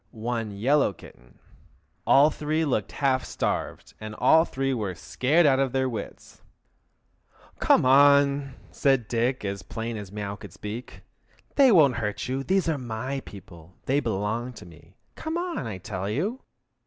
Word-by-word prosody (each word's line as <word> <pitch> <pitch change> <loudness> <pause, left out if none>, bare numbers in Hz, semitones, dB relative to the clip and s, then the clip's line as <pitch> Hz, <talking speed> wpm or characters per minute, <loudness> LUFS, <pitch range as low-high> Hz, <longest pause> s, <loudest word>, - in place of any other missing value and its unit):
One 115 0 -3
yellow 135 +1 +2
kitten. - - -17 0.7
All 145 +3 +6
three 155 +2 -1
looked 110 -8 -1
half 130 -2 +1
starved, - - -3
and 110 0 -7
all 160 +7 +5
three 135 -2 -2
were 105 -7 -3
scared 145 - +1
out 135 -2 +4
of 135 -2 0
their 130 0 +1
wits! 115 -5 -8 1.2
"Come - - +4
on!" 140 0 +4 0.2
said 135 -5 +1
Dick, 120 +1 -1
as 100 0 -3
plain 115 0 -5
as 100 -3 -8
mew 100 -1 -5
could - - -12
speak. 110 +4 -8 0.5
"They 270 -3 +6
won't 145 - +5
hurt 105 +2 -3
you; 130 +1 -2
those 190 +4 +1
are 155 -3 0
my 125 +3 -4
people: 90 -3 -13
they 140 +2 +2
belong 115 +1 -2
to - - -12
me. 85 +1 -17 0.2
Come 320 +1 -4
on, 350 0 -3
I 105 -4 -5
tell 95 +1 -5
you!" 195 - -2
125 Hz, 155 wpm, -26 LUFS, 105-140 Hz, 1.2 s, All